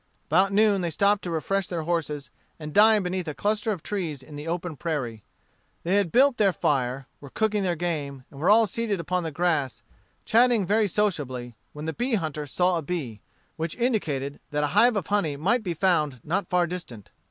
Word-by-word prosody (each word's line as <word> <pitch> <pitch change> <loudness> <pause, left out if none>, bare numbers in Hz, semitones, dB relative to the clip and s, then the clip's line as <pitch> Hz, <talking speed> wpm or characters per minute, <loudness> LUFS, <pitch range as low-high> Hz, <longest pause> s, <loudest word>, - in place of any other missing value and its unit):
About 185 +6 +4
noon 205 -1 +3
they 170 - -1
stopped 200 +5 +2
to - - -3
refresh 180 +4 -1
their 170 -3 -3
horses 155 -4 -2 0.3
and 150 -1 -7
dine 215 0 +6
beneath 180 -1 -3
a 150 - -4
cluster 210 +5 0
of 185 -7 -4
trees 165 -10 -3
in 150 +3 -12
the 150 +2 -7
open 170 -1 -3
prairie. 130 -10 -3 0.6
They 175 - 0
had 195 -5 +1
built 265 +1 +4
their 200 -2 +4
fire, 135 -5 -1
were 140 - -11
cooking 215 +5 0
their 180 -3 0
game, 150 -6 -3
and 140 - -12
were 165 - +1
all 225 +2 +6
seated 210 -1 -2
upon 180 +2 -1
the 165 - -3
grass, 155 -5 -1 0.4
chatting 235 -2 +4
very 210 +3 +2
sociably, 145 - -2 0.2
when 150 +1 -7
the 160 - -2
bee 245 0 0
hunter 155 -5 -3
saw 180 +4 +1
a - - -4
bee, 140 - -4 0.4
which 160 0 -3
indicated 155 - -1
that 150 0 -1
a - - +2
hive 240 0 +5
of 195 -5 -1
honey 165 -8 0
might 215 - +1
be 180 -5 -3
found 155 -7 +1
not 180 +3 -2
far 180 -1 +3
distant. 160 - -7
175 Hz, 200 wpm, -26 LUFS, 150-205 Hz, 0.6 s, dine